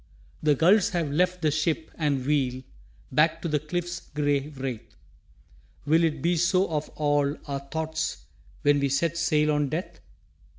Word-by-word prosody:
The 150 -1 +3
gulls 180 +8 +4
have 165 -5 -1
left 180 +3 +1
the 155 - +3
ship 155 +1 -1
and 140 -5 -1
wheel 130 -3 0 0.5
Back 160 +2 +3
to - - -1
the 150 -2 +1
cliff's 175 +3 -4
gray 145 -1 -1
wraith. 130 -5 -6 0.9
Will 160 +3 +4
it 155 -4 0
be 170 +1 +2
so 185 +3 +3
of 150 -1 -2
all 145 -1 +1
our 140 -1 -2
thoughts 155 - -4 0.4
When 145 0 +4
we 140 0 +1
set 155 +5 0
sail 155 -2 +2
on 145 -1 +1
Death? 160 +6 -4
150 Hz, 160 wpm, -26 LUFS, 145-165 Hz, 0.9 s, gulls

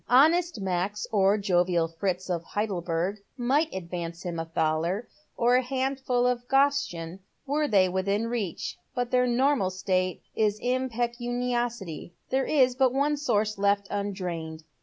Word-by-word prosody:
Honest 320 +3 +4
Max, 190 +2 -1
or 200 -1 +4
jovial 175 -4 +2
Fritz 180 +2 -3
of 175 -3 -2
Heidelberg 180 -2 -2 0.2
might 275 +6 +1
advance 170 -1 -5
him 175 -2 -4
a 165 - -2
thaler 165 +6 0 0.2
— - - -42
or 240 +1 +3
a - - +3
handful 260 -1 0
of 245 -1 0
groschen 270 -12 +1
— - - -46
were 295 +2 +1
they 195 -6 +4
within 200 +4 0
reach, 225 -7 -3 0.2
but 245 -1 -1
their 250 0 +3
normal 250 -4 +2
state 185 -1 -1
is 215 -1 +2
impecuniosity. 240 - -2 0.2
There 265 +1 +2
is 260 -4 +3
but 260 0 +3
one 290 +2 +2
source 215 -7 0
left 200 0 +2
undrained. 180 -6 -4
210 Hz, 145 wpm, -27 LUFS, 180-250 Hz, 0.2 s, Honest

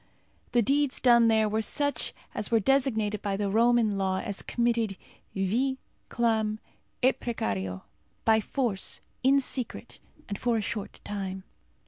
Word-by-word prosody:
The 240 -1 +4
deeds 280 +2 +1
done 235 -2 +6
there 220 -1 +4
were 215 +1 0
such 285 +6 -1 0.2
as 210 - -3
were 230 - +4
designated 220 -4 +1
by 195 -1 -1
the 200 -1 -1
Roman 225 -2 +3
law 190 -1 +1
as 200 -1 -4
committed 230 -4 0 0.4
vi, 235 +8 +1 0.3
clam, 220 -2 +1 0.4
et 260 +1 +4
precario 95 - -3 0.4
by 220 -1 +5
force, 225 -5 -2 0.2
in 270 +2 +5
secret, 255 -2 -4 0.3
and 200 -1 -4
for 240 -1 +1
a - - +1
short 210 0 -4
time. 190 -2 -4
220 Hz, 140 wpm, -28 LUFS, 200-240 Hz, 0.4 s, done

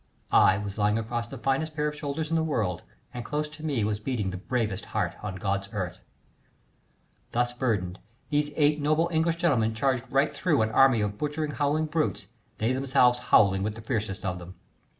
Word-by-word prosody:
I 95 - +6
was 105 0 -5
lying 105 +1 +3
across 115 +1 -3
the 135 - -8
finest 135 +5 -1
pair 150 0 0
of 150 - -3
shoulders 150 +2 -4
in - - +2
the 165 - +3
world, 110 - -1 0.3
and 120 - -5
close 150 +4 -2
to 155 +1 -12
me 140 -8 0
was 105 0 -1
beating 105 -4 -2
the 95 - -5
bravest 110 -1 -2
heart 105 -1 -1
on 105 -3 -4
God's 100 +1 -2
earth. 95 -3 -3 1.3
Thus 120 0 +1
burdened, 100 -8 -1 0.3
these 145 0 +1
eight 150 0 +3
noble 155 +4 +2
English 165 +1 +2
gentlemen 125 -10 +1
charged 130 +1 0
right 135 +2 +2
through 155 -10 +2
an 110 - -1
army 130 -1 +5
of 105 0 -2
butchering, 150 0 -2
howling 150 +2 +1
brutes, 150 -10 -1 0.3
they 115 +4 +1
themselves 130 -2 +3
howling 95 -2 +5
with 105 +2 -2
the 115 - -9
fiercest 110 -4 -3
of 90 -1 -2
them. 90 +1 -10
120 Hz, 190 wpm, -27 LUFS, 105-150 Hz, 1.3 s, I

